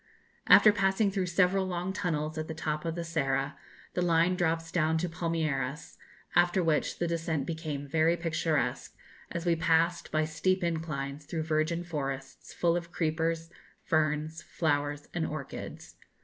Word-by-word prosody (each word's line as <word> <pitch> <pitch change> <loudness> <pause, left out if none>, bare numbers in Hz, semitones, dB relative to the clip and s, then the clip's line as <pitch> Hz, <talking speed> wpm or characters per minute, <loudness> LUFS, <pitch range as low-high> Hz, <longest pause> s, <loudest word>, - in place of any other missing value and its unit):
After 210 - +8
passing 195 +1 +2
through 190 -2 -1
several 185 +2 +2
long 180 +1 -2
tunnels 155 -4 -2
at 155 0 -3
the 160 - -5
top 155 0 -2
of 165 -1 -2
the 170 - -3
Serra, 140 -4 -1 0.4
the 180 - 0
line 170 +1 +3
drops 165 -2 0
down 160 -1 +2
to 175 +2 0
Palmeiras, 155 -4 -2 0.4
after 175 +1 +4
which 160 -2 +1
the 175 - 0
descent 165 -4 -1
became 155 -3 -4
very 160 +3 +3
picturesque, 160 -6 -1 0.4
as 170 0 -4
we 170 -1 +3
passed, 165 +1 +2
by 155 0 +2
steep 185 +4 0
inclines, 150 -4 -3
through 160 -2 -2
virgin 160 +2 0
forests 135 -5 -5
full 170 -1 +1
of 170 -1 -4
creepers, 165 0 -1 0.3
ferns, 155 0 0
flowers, 145 -2 -1
and 165 -2 -1
orchids. 150 -3 -7
165 Hz, 150 wpm, -30 LUFS, 155-175 Hz, 0.4 s, After